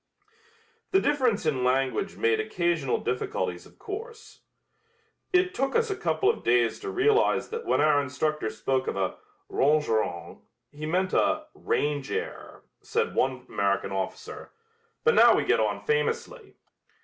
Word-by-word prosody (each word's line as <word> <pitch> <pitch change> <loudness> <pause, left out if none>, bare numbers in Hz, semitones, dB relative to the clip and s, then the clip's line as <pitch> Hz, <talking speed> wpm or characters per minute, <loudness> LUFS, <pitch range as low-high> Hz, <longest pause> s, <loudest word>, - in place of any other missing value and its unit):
The 385 - +4
difference 255 - +1
in 135 -5 0
language 130 +9 0
made 445 0 +2
occasional 170 - 0
difficulties 95 -7 -3
of - - -22
course. 450 +3 -8 0.9
"It 365 0 +3
took 270 +1 -1
us 460 -2 +2
a - - -1
couple 390 +1 0
of 445 - +1
days 120 -1 +2
to 400 - -5
realize 420 +3 +2
that 460 +1 -6
when - - +2
our 150 -1 +4
instructor 145 -2 -2
spoke 130 +4 -1
of - - -2
a 95 -1 -1 0.3
'rangerrang' 110 - 0 0.3
he 150 +1 -6
meant 185 +3 0
a 310 0 +2
'range 145 -2 -1
error,'" - - -5 0.2
said - - -1
one 130 -1 0
American 100 -1 -1
officer, 95 -1 -5 0.5
"but 465 - +4
now - - +7
we - - 0
get - - +3
on - - 0
famously." 465 0 -2
155 Hz, 145 wpm, -27 LUFS, -, 0.9 s, now